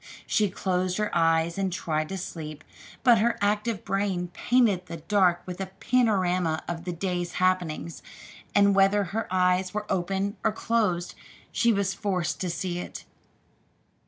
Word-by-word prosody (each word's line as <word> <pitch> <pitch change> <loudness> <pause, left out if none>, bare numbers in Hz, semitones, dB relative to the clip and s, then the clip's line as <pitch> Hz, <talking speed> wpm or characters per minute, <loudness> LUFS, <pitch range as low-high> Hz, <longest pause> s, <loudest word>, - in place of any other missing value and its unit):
She 210 -3 +2
closed 185 -1 -1
her 210 -3 -1
eyes 165 +1 +2
and 190 -1 0
tried 155 -4 -2
to 190 - -4
sleep, 155 -4 -7 0.4
but 240 -3 +6
her 235 +2 +2
active 210 +1 0
brain 190 -2 -1
painted 205 -3 +2
the 165 - -6
dark 175 +1 +2
with 180 +1 -6
a 190 - -3
panorama 185 -9 +1
of 170 0 -5
the 180 - -2
day's 175 0 -3
happenings, 180 -3 0 0.5
and 200 0 +5
whether 195 +1 +4
her 210 +4 -3
eyes 185 +1 +2
were 210 0 -2
open 195 +3 -1
or 220 - +2
closed, 215 -7 0 0.4
she 235 - +3
was 200 -3 0
forced 190 -4 -2
to 185 - -1
see 175 +1 -3
it. - - -7
185 Hz, 155 wpm, -27 LUFS, 175-205 Hz, 0.5 s, but